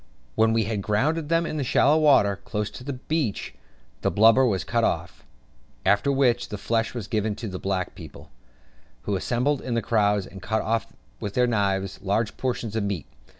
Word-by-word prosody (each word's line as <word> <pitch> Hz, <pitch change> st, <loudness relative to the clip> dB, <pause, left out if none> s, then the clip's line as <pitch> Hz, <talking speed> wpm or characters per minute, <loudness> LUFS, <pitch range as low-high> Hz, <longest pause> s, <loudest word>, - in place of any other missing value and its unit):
When 110 Hz, -, +3 dB
we 115 Hz, 0 st, +2 dB
had 105 Hz, -1 st, -2 dB
grounded 145 Hz, +10 st, 0 dB
them 165 Hz, 0 st, +2 dB
in 155 Hz, -, -3 dB
the 145 Hz, -, -1 dB
shallow 145 Hz, +4 st, +4 dB
water, 120 Hz, -10 st, +4 dB
close 105 Hz, +1 st, -4 dB
to -, -, -10 dB
the 140 Hz, +2 st, -4 dB
beach, 130 Hz, -, -2 dB, 0.5 s
the -, -, +1 dB
blubber 115 Hz, +5 st, +5 dB
was 95 Hz, -5 st, 0 dB
cut 115 Hz, -1 st, 0 dB
off; -, -, -2 dB, 0.6 s
after 105 Hz, +7 st, +3 dB
which, 125 Hz, -3 st, +2 dB
the 105 Hz, -, -4 dB
flesh 115 Hz, +3 st, -1 dB
was 115 Hz, -5 st, -4 dB
given 110 Hz, -2 st, -1 dB
to 115 Hz, +1 st, -6 dB
the 95 Hz, -2 st, -5 dB
black 95 Hz, -2 st, -2 dB
people, -, -, -12 dB, 0.7 s
who 100 Hz, -, -1 dB
assembled 125 Hz, +8 st, 0 dB
in 120 Hz, -2 st, -1 dB
crowds, 105 Hz, -3 st, +2 dB
and 95 Hz, -1 st, -11 dB
cut 110 Hz, +4 st, -1 dB
off 115 Hz, 0 st, -1 dB, 0.3 s
with 105 Hz, -2 st, -5 dB
their 125 Hz, -, +4 dB
knives 100 Hz, -4 st, 0 dB
large 105 Hz, +3 st, 0 dB
portions 120 Hz, -4 st, -3 dB
of 110 Hz, -, +1 dB
the 100 Hz, -, -1 dB
meat. 95 Hz, -6 st, -3 dB
110 Hz, 195 wpm, -25 LUFS, 100-125 Hz, 0.7 s, blubber